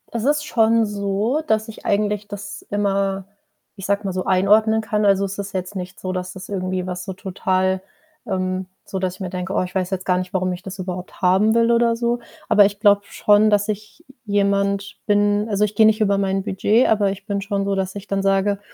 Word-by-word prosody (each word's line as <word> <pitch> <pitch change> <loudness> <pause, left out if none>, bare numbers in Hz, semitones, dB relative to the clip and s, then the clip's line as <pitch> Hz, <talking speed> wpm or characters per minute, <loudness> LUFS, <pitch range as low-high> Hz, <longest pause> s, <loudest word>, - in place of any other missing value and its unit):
es 230 0 -3
ist 295 +1 +2
schon 225 -3 +3
so, 205 +6 -1
dass 220 -4 +1
ich 220 - -11
eigentlich 205 0 0
das 205 0 -7
immer, 195 -1 0 0.5
ich 195 -1 -6
sage 200 +1 0
mal 190 - -2
so, 185 0 -3
einordnen 215 +4 +3
kann. 210 -1 -1
Also, 200 -1 +3
es 195 +1 -5
ist 200 0 -5
jetzt 185 +2 -4
nicht 185 0 -6
so, 185 - -3
dass 180 0 -4
das 190 0 -10
irgendwie 185 -2 -2
was 180 0 -5
so 190 - -5
total, 185 0 -1 0.4
ähm 185 -2 -2 0.2
so, 190 - -3
dass 185 -1 -1
ich 185 - -17
mir 185 -2 -4
denke: 185 +1 -4
„Oh, - - +1
ich 180 0 -9
weiß 185 -1 -1
jetzt 190 -1 -3
gar 180 - +3
nicht, 185 0 -4
warum 185 -1 0
ich 180 0 -7
das 190 +1 -8
überhaupt 185 -1 -6
haben 195 +5 +3
will” 230 0 +4
oder 235 0 +3
so. 240 +1 -1 0.3
Aber 210 -2 +6
ich 200 0 -4
glaube 205 -1 +5
schon, 210 +1 +3
dass 205 -1 +2
ich 215 +9 -6 0.2
j 205 0 -1
jemand 200 0 +1
bin 205 0 +2
also, 210 -1 +1
ich 210 0 -2
gehe 220 - +6
nicht 220 +1 +3
über 200 -2 +2
mein 195 -1 0
Budget, 210 +4 +2
aber 205 -3 +3
ich 195 +1 -7
bin 200 -2 -1
schon 200 0 -2
so, 200 0 0
dass 190 0 -3
ich 200 0 -7
dann 195 0 -1
sage: 195 +1 +1
200 Hz, 230 wpm, -21 LUFS, 190-210 Hz, 0.5 s, Aber